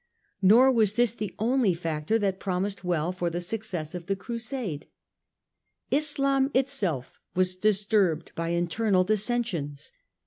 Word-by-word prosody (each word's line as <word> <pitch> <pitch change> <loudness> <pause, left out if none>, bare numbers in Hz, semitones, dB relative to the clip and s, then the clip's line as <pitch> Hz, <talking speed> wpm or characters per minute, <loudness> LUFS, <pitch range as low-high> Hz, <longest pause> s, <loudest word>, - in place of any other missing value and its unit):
Nor 230 +7 +6
was 215 -4 +2
this 240 -1 +2
the 215 -4 -5
only 230 -4 +2
factor 165 +4 -1
that 195 -3 -1
promised 195 +1 -2
well 175 -1 0
for 180 -1 -2
the 170 +1 -3
success 175 -4 -4
of 175 -1 -7
the 195 - 0
Crusade. 225 - -5 1.0
Islam 275 -2 +2
itself 215 - -1 0.2
was 185 0 +1
disturbed 200 -4 +1
by 165 0 -3
internal 185 +3 +1
dissensions. 200 - -1
195 Hz, 130 wpm, -27 LUFS, 175-230 Hz, 1.0 s, Nor